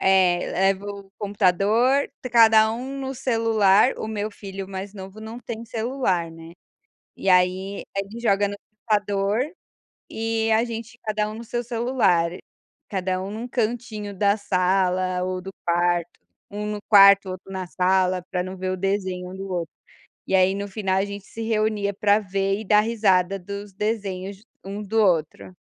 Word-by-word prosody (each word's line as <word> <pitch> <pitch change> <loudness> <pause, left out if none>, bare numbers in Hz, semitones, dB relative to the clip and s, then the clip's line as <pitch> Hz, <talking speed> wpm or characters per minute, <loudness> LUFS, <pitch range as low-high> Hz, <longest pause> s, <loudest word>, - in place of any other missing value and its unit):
eh, 185 -2 +4
leva 195 +1 +1
o 200 -1 -8
computador, 205 +7 +2 0.2
cada 220 -2 +6
um 265 +4 -5
no 265 0 -3
celular, 225 -4 +3
o - - -4
meu 215 -1 -3
filho 195 -2 -8
mais 195 +1 -6
novo 195 +2 -9
não 225 +2 -8
tem 230 -1 -6
celular, 225 -7 -1
né. 165 0 -12 0.6
E - - -4
aí, 185 +2 +2
ele 200 +4 -4
joga 205 -3 +2
no 200 - -4 0.3
computador, 205 +2 +1 0.7
e 225 0 -1
a 220 +1 +3
gente, 230 0 -6
cada 215 -1 -1
um 215 - -7
no 230 - -8
seu 240 +1 -3
celular, 230 -8 +2 0.6
cada 185 -1 -1
um 190 - -5
num 220 +3 -5
cantinho 220 -3 -3
da 200 +1 +3
sala 185 -2 +1
ou 185 0 -2
do 190 - -7 0.2
quarto, 175 0 +1 0.3
um 205 +1 -5
no 210 0 -3
quarto, 200 -2 +7
outro 185 +1 -9
na 190 -1 -4
sala, 185 0 +1
pra 180 -2 0
não 185 +1 -6
ver 185 0 -3
o 185 - -2
desenho 190 -1 -2
um - - -8
do 195 0 -7
outro, 170 -3 -3 0.5
e - - +2
aí 185 0 +4
no 200 +1 -4
final 190 -2 -1
a 195 - +2
gente 200 -1 -8
se 225 - -9
reunia 215 -2 0
para 205 +1 +3
ver 195 0 -1
e 220 - -7
dar 210 +1 +5
risada 195 -4 +2
dos 200 +2 -7
desenhos 200 -1 -3 0.2
um 200 +2 -5
do 220 +3 0
outro. 155 - 0
200 Hz, 170 wpm, -24 LUFS, 185-220 Hz, 0.7 s, quarto